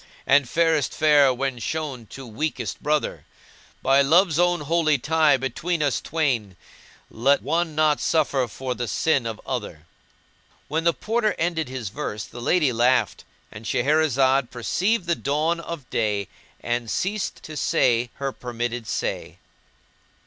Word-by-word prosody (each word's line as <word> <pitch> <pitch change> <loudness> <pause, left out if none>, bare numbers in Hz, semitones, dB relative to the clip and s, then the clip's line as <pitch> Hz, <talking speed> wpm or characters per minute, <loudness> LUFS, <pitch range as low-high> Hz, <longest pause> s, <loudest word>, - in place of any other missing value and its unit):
* - - -26
And 140 -2 +4
fairest 165 -2 +2
fair 145 -3 +5
when 130 0 -2
shown 130 -2 -4
to 135 +5 -10
weakest 120 -1 -4
brother: 150 0 -1 0.6
By 135 +1 +5
Love's 165 +3 +4
own 175 -2 +2
holy 155 0 +2
tie 155 +2 +3
between 150 +6 -2
us 140 -3 0
twain, 125 - -1 0.3
* - - -26
Let 135 +5 +2
one 165 +2 -1
not 155 -1 +2
suffer 140 -5 +1
for 125 +3 -4
the 120 -1 -4
sin 135 -1 +1
of 110 -2 -5
other." 105 - -5 0.8
When 160 +2 -2
the 170 - +4
Porter 220 +2 0
ended 160 -4 -1
his 130 -6 -5
verse 105 +1 -5
the 120 - -10
lady 150 -1 +2
laughed. 120 -3 +1 0.3
And 110 - -10
Shahrazad 135 0 +2
perceived 185 - 0
the 170 - +1
dawn 155 +3 0
of 170 -6 -7
day 105 -3 -1 0.3
and 120 -1 -2
ceased 195 - -2
to 155 - -8
say 120 -4 +2
her 140 -1 -3
permitted 120 -2 -4
say. - - -3
140 Hz, 150 wpm, -24 LUFS, 120-160 Hz, 0.8 s, fair